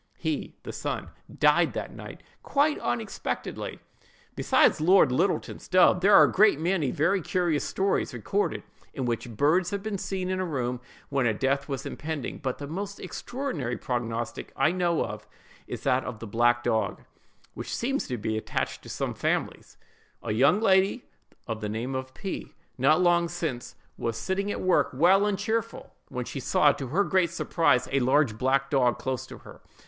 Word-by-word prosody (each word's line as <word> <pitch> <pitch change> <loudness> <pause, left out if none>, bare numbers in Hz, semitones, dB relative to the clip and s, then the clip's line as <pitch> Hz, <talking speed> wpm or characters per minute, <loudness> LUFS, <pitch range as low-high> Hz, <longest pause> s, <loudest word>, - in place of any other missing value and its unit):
He - - -3
(the - - -7
son) - - -4 0.2
died - - +3
that - - -5
night - - -10 0.2
quite 295 +2 +1
unexpectedly. 120 -2 -4 0.6
Besides - - +3
Lord 175 -4 +5
Littleton's 180 +9 -1
dove, 180 -1 +5
there 200 +2 +6
are - - +9
a - - +3
great 205 -6 +4
many 165 -4 +1
very 175 +9 +1
curious 170 -3 0
stories 195 +1 0
recorded 160 - -2 0.3
in 130 - -2
which 120 +1 -2
birds 165 +7 +3
have 200 -1 -4
been 215 -3 -3
seen 185 -1 -3
in 185 - -1
a - - 0
room 125 -7 -2 0.3
when 135 -3 +1
a 110 - +1
death 135 +4 0
was 135 -2 -4
impending; 150 -3 -5
but 130 -3 -3
the 145 - -6
most 195 +7 -5
extraordinary 185 - -4
prognostic 120 -2 -3
I 155 - +3
know 170 - -1 0.5
is - - -6
that 130 +1 +2
of 125 - -6
"the 115 - -8
black 120 +3 +2
dog," 110 -4 -1 0.5
which - - -5
seems 270 +4 -1
to 125 - -3
be 110 0 -2
attached - - -3
to - - -12
some - - -3
families:— - - -2 0.5
A - - -2
young 140 - +4
lady 195 +2 +3 0.4
of 115 -2 -4
the 105 - -3
name 115 +5 -3
of 130 0 -5
P——, 195 -3 -6 0.2
not 150 +7 +3
long 175 -1 +3
since 160 -9 -4 0.2
was 115 -1 -2
sitting 190 - -2
at - - -3
work, 185 -1 +3
well 190 +8 +5
and 205 -2 0
cheerful, 230 +3 -3
when 125 -2 -4
she 135 - -5
saw, 145 +3 +4
to 135 -1 -5
her 175 +11 +2
great 185 -3 +2
surprise, 165 -5 +1
a 140 - +2
large 130 -3 +2
black 135 +1 +1
dog 125 -4 +3
close 130 -1 -3
to - - -10
her. - - -14
145 Hz, 175 wpm, -27 LUFS, 125-185 Hz, 0.6 s, are